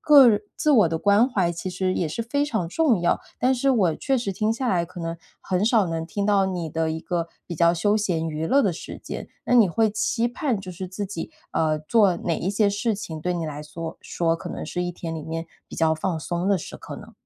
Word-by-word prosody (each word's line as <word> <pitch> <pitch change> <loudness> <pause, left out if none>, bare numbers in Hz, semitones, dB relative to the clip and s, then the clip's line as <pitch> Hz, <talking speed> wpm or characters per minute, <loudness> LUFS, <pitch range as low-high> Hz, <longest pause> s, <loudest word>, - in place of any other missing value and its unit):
个 290 -4 +8
人 210 -2 +3 0.2
自 305 - +1
我 220 - +6
的 165 - -1
关 205 +8 +4
怀 185 -9 +1
其 170 +2 -5
实 185 +1 -1
也 170 - 0
是 195 +10 -3
非 285 +5 0
常 220 - -1
重 250 - +2
要。 175 - +2 0.2
但 255 +1 +3
是 275 +2 0
我 190 -11 +3
确 270 - 0
实 220 -5 -2
听 215 +3 0
下 240 +3 -1
来 170 -2 +1
可 180 0 -11
能， 165 0 -3 0.3
很 185 +1 0
少 220 -3 +4
能 165 -1 -3
听 200 +4 -2
到 200 -2 +3
你 175 -4 -3
的 160 +1 0
一 160 - -2
个 170 -1 -2 0.2
比 170 - -5
较 170 +2 +4
休 205 +5 +2
闲 170 -6 0
娱 155 0 -3
乐 280 +10 +4
的 195 - +2
时 160 - -8
间， - - -7 0.2
那 - - -1
你 220 -6 +6
会 220 +6 +2
期 225 +2 0
盼 245 - -1
就 190 -2 -7
是 185 +1 -6
自 200 +3 -4
己， 185 -4 -5 0.2
呃， 155 -1 +1
做 185 +3 +3
哪 170 -1 -2
一 185 - -2
些 205 +1 +2
事 215 +3 0
情 170 -6 -6
对 180 +3 -1
你 170 -2 -2
来 150 -1 -5
缩 165 +2 -7
说 165 -1 0
可 175 +1 -7
能 - - -5
是 180 - -3
一 175 - -2
天 165 -1 -6
里 160 - -5
面， 165 +1 -4 0.2
比 - - -9
较 160 -1 +3
放 165 +1 -2
松 175 +4 -2
的 200 - +4
时 160 - -8
刻 - - -8
呢？ - - -12
185 Hz, 275 characters per minute, -24 LUFS, 165-215 Hz, 0.3 s, 个